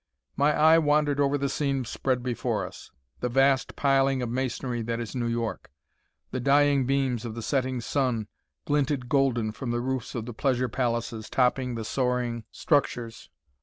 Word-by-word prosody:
My 145 Hz, +2 st, +3 dB
eye 160 Hz, +2 st, +6 dB
wandered 150 Hz, -2 st, +2 dB
over 140 Hz, 0 st, +2 dB
the 140 Hz, 0 st, -1 dB
scene 135 Hz, -2 st, -1 dB
spread 125 Hz, +1 st, -1 dB
before 125 Hz, -3 st, -1 dB
us, -, -, -11 dB, 0.3 s
the 125 Hz, -, -1 dB
vast 135 Hz, +1 st, +2 dB
piling 135 Hz, -2 st, +2 dB
of 120 Hz, -, -3 dB
masonry 125 Hz, -1 st, -2 dB
that 115 Hz, +1 st, -2 dB
is 115 Hz, -2 st, -5 dB
New 120 Hz, -2 st, -1 dB
York. 115 Hz, -1 st, -3 dB, 0.6 s
The 130 Hz, -, -2 dB
dying 140 Hz, 0 st, +3 dB
beams 135 Hz, -4 st, 0 dB
of 115 Hz, -2 st, -5 dB
the 115 Hz, -, -5 dB
setting 130 Hz, -1 st, -1 dB
sun 120 Hz, -4 st, -1 dB, 0.4 s
glinted 145 Hz, -4 st, 0 dB
golden 125 Hz, -6 st, +2 dB
from 120 Hz, +3 st, -6 dB
the 120 Hz, 0 st, 0 dB
roofs 130 Hz, 0 st, -3 dB
of 115 Hz, -2 st, -3 dB
the 120 Hz, -, -6 dB
pleasure 125 Hz, 0 st, 0 dB
palaces 115 Hz, -2 st, -2 dB
topping 125 Hz, -1 st, +1 dB
the 115 Hz, -1 st, -4 dB
soaring 125 Hz, -2 st, -1 dB
structures. 120 Hz, -6 st, -1 dB
130 Hz, 165 wpm, -27 LUFS, 120-140 Hz, 0.6 s, eye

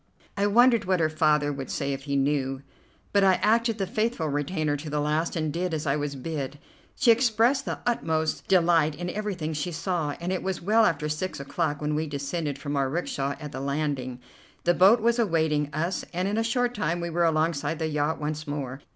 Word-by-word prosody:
I 200 Hz, 0 st, +1 dB
wondered 235 Hz, +2 st, +5 dB
what 185 Hz, -1 st, +1 dB
her 155 Hz, -1 st, +2 dB
father 150 Hz, -2 st, +2 dB
would 135 Hz, -1 st, -6 dB
say 140 Hz, 0 st, -2 dB
if 135 Hz, 0 st, -6 dB
he 140 Hz, -1 st, -1 dB
knew, 135 Hz, -1 st, 0 dB, 0.5 s
but 200 Hz, -1 st, +4 dB
I 190 Hz, -1 st, +5 dB
acted 230 Hz, +2 st, +2 dB
the 195 Hz, -, -1 dB
faithful 215 Hz, -2 st, -1 dB
retainer 145 Hz, +1 st, -1 dB
to 150 Hz, +2 st, -7 dB
the 150 Hz, 0 st, -1 dB
last, 150 Hz, +3 st, 0 dB
and 155 Hz, -3 st, -1 dB
did 175 Hz, 0 st, -1 dB
as 155 Hz, -, -4 dB
I 140 Hz, -1 st, +2 dB
was 145 Hz, -1 st, -3 dB
bid. 145 Hz, 0 st, -4 dB, 0.4 s
She 235 Hz, -, +5 dB
expressed 240 Hz, +3 st, +3 dB
the -, -, -3 dB
utmost 160 Hz, -10 st, -1 dB
delight 165 Hz, -4 st, +3 dB
in 175 Hz, +3 st, -4 dB
everything 190 Hz, -7 st, -3 dB
she 155 Hz, +4 st, -3 dB
saw, 165 Hz, -3 st, -2 dB
and 175 Hz, +2 st, -2 dB
it 185 Hz, -, -2 dB
was 190 Hz, -1 st, -2 dB
well 220 Hz, +5 st, +3 dB
after 150 Hz, -2 st, -1 dB
six 155 Hz, +4 st, -3 dB
o'clock 145 Hz, +1 st, -2 dB
when 150 Hz, 0 st, 0 dB
we 155 Hz, +1 st, -1 dB
descended 145 Hz, +1 st, -3 dB
from 145 Hz, +1 st, -4 dB
our 135 Hz, -1 st, +1 dB
'rickshaw 140 Hz, -3 st, -2 dB
at 150 Hz, -2 st, -7 dB
the 130 Hz, -, -5 dB
landing. 140 Hz, -3 st, -2 dB, 0.4 s
The 175 Hz, -, +4 dB
boat 200 Hz, +6 st, +6 dB
was 235 Hz, +2 st, +2 dB
awaiting 160 Hz, -7 st, +1 dB
us, 165 Hz, +5 st, -2 dB
and 180 Hz, +2 st, -1 dB
in 210 Hz, +2 st, 0 dB
a -, -, +1 dB
short 245 Hz, +1 st, 0 dB
time 175 Hz, -6 st, -1 dB
we 170 Hz, 0 st, -3 dB
were 170 Hz, +1 st, +1 dB
alongside 160 Hz, -1 st, +1 dB
the 160 Hz, -, -2 dB
yacht 150 Hz, 0 st, -1 dB
once 150 Hz, 0 st, -4 dB
more. 140 Hz, -2 st, -4 dB
160 Hz, 210 wpm, -26 LUFS, 145-185 Hz, 0.5 s, boat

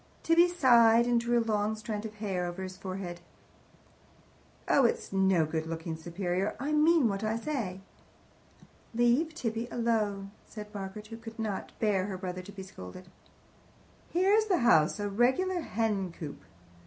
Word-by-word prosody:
Tibby 335 Hz, +2 st, +5 dB
sighed, 235 Hz, -9 st, +5 dB
and 240 Hz, -1 st, +2 dB
drew 240 Hz, 0 st, +1 dB
a 230 Hz, -, +1 dB
long 215 Hz, -1 st, 0 dB
strand 215 Hz, 0 st, -5 dB
of 215 Hz, -, -13 dB
hair 190 Hz, -4 st, -2 dB
over 175 Hz, +2 st, -5 dB
his 185 Hz, 0 st, -6 dB
forehead. 185 Hz, -2 st, -6 dB, 1.5 s
"Oh, 280 Hz, -, +4 dB
it's 235 Hz, -, 0 dB
no 190 Hz, -4 st, +3 dB
good 160 Hz, +1 st, -3 dB
looking 165 Hz, 0 st, -4 dB
superior. 175 Hz, +4 st, -2 dB
I 280 Hz, +4 st, -2 dB
mean 305 Hz, -2 st, +4 dB
what 200 Hz, 0 st, -2 dB
I 220 Hz, +1 st, 0 dB
say." 230 Hz, -8 st, -3 dB, 1.1 s
"Leave 245 Hz, +7 st, +2 dB
Tibby 230 Hz, -5 st, -3 dB
alone!" 210 Hz, -4 st, -1 dB, 0.2 s
said 210 Hz, -1 st, -9 dB
Margaret, 200 Hz, +1 st, -6 dB
who 225 Hz, -, -7 dB
could 225 Hz, -1 st, -10 dB
not 215 Hz, -4 st, -3 dB
bear 200 Hz, -3 st, +1 dB
her 190 Hz, -2 st, -4 dB
brother 185 Hz, -1 st, -5 dB
to 190 Hz, +2 st, -11 dB
be 195 Hz, -1 st, -8 dB
scolded. 180 Hz, -, -11 dB, 1.0 s
"Here's 395 Hz, +5 st, +3 dB
the 385 Hz, -4 st, +2 dB
house 160 Hz, -5 st, +4 dB
a 205 Hz, -, -1 dB
regular 260 Hz, -, +1 dB
hen 210 Hz, -, -1 dB
coop!" 155 Hz, -4 st, -9 dB
210 Hz, 155 wpm, -30 LUFS, 190-240 Hz, 1.5 s, Tibby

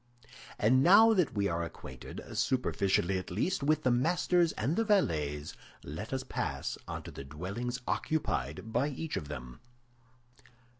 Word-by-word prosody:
And 125 Hz, +5 st, +4 dB
now 210 Hz, +8 st, +7 dB
that 180 Hz, -, +1 dB
we 100 Hz, -1 st, +1 dB
are 85 Hz, -1 st, -1 dB
acquainted, 65 Hz, -6 st, -8 dB
superficially 95 Hz, -7 st, +1 dB
at 90 Hz, -, -8 dB
least, 130 Hz, -, -1 dB
with 155 Hz, +2 st, +2 dB
the 130 Hz, -, +3 dB
masters 170 Hz, +6 st, +2 dB
and 130 Hz, +9 st, -1 dB
the 225 Hz, -, +2 dB
valets, 75 Hz, -, +1 dB, 0.3 s
let 80 Hz, +10 st, -6 dB
us 130 Hz, 0 st, -2 dB
pass -, -, -3 dB
on -, -, -5 dB
to -, -, -8 dB
the -, -, -8 dB
dwellings 100 Hz, -, -4 dB
occupied 110 Hz, -, -2 dB
by 125 Hz, +4 st, +2 dB
each 150 Hz, +3 st, -4 dB
of 75 Hz, -, -4 dB
them. 60 Hz, -4 st, -8 dB
120 Hz, 150 wpm, -31 LUFS, -, 0.3 s, now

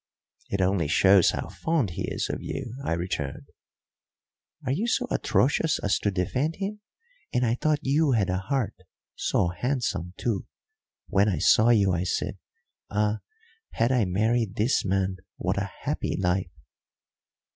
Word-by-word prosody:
"It 100 Hz, -, -1 dB
only 90 Hz, -4 st, +2 dB
shows 95 Hz, +3 st, +5 dB
how -, -, -3 dB
fond 160 Hz, -, 0 dB
he -, -, -3 dB
is -, -, -1 dB
of -, -, -4 dB
you," 125 Hz, -4 st, -5 dB
I 85 Hz, -, 0 dB
returned. 85 Hz, -5 st, -3 dB, 1.2 s
"Are 130 Hz, -, 0 dB
you 195 Hz, -, 0 dB
so 250 Hz, +1 st, +1 dB
atrocious 150 Hz, +3 st, +2 dB
as 100 Hz, -, 0 dB
to 100 Hz, -, 0 dB
defend 125 Hz, -, -1 dB
him? 205 Hz, +2 st, -4 dB, 0.5 s
And 125 Hz, 0 st, +1 dB
I 115 Hz, -, +2 dB
thought 150 Hz, +4 st, 0 dB
you 145 Hz, +1 st, +3 dB
had 105 Hz, -5 st, +2 dB
a 90 Hz, -, 0 dB
heart 130 Hz, +3 st, -1 dB, 0.4 s
so 85 Hz, -, +1 dB
handsome, 90 Hz, -, -2 dB
too! 110 Hz, -6 st, -2 dB, 0.6 s
When 100 Hz, +1 st, +3 dB
I 95 Hz, -, 0 dB
saw 110 Hz, +2 st, +5 dB
you 100 Hz, -5 st, +4 dB
I 90 Hz, +1 st, 0 dB
said, 95 Hz, +1 st, -2 dB, 0.5 s
Ah, 105 Hz, +1 st, +1 dB, 0.5 s
had 115 Hz, +2 st, +2 dB
I 125 Hz, -5 st, +3 dB
married 110 Hz, +3 st, +1 dB
this 115 Hz, +6 st, +2 dB
man, 95 Hz, -1 st, 0 dB, 0.2 s
what 95 Hz, +2 st, -1 dB
a 100 Hz, 0 st, -3 dB
happy -, -, -1 dB
life!" 90 Hz, -1 st, 0 dB
105 Hz, 155 wpm, -26 LUFS, 95-130 Hz, 1.2 s, shows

